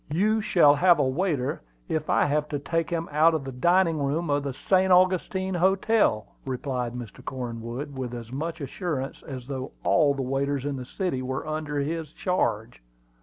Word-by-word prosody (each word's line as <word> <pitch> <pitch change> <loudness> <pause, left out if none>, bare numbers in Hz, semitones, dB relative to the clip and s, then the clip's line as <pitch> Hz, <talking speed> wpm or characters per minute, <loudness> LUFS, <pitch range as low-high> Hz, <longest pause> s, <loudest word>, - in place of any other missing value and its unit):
"You 210 +8 +2
shall 165 -8 +5
have 175 +4 +5
a 145 - +2
waiter 145 -2 -1 0.3
if 155 -1 -2
I - - +4
have 150 +1 0
to 145 - -1
take 165 +4 -1
him 165 -1 -2
out 160 +2 +4
of 155 - -2
the 135 - -6
dining 170 +5 +2
room 145 +3 -1
of 145 0 +2
the 140 -1 -3
St. 185 +7 +2
Augustine 185 +1 +3
Hotel," 190 - +2 0.2
replied 125 -2 -3
Mr. 120 -4 -8
Cornwood, 120 +2 -5
with 125 -2 -4
as 115 -1 -8
much 160 +4 -4
assurance 140 -1 -4
as 130 -4 -8
though 130 -1 -5
all 150 -4 +3
the 135 - -2
waiters 135 +1 -1
in 145 -1 -2
the 130 - -6
city 175 -2 -2
were 130 +1 -3
under 155 -1 -3
his 155 +1 -3
charge. 110 - -1
145 Hz, 180 wpm, -26 LUFS, 130-170 Hz, 0.3 s, shall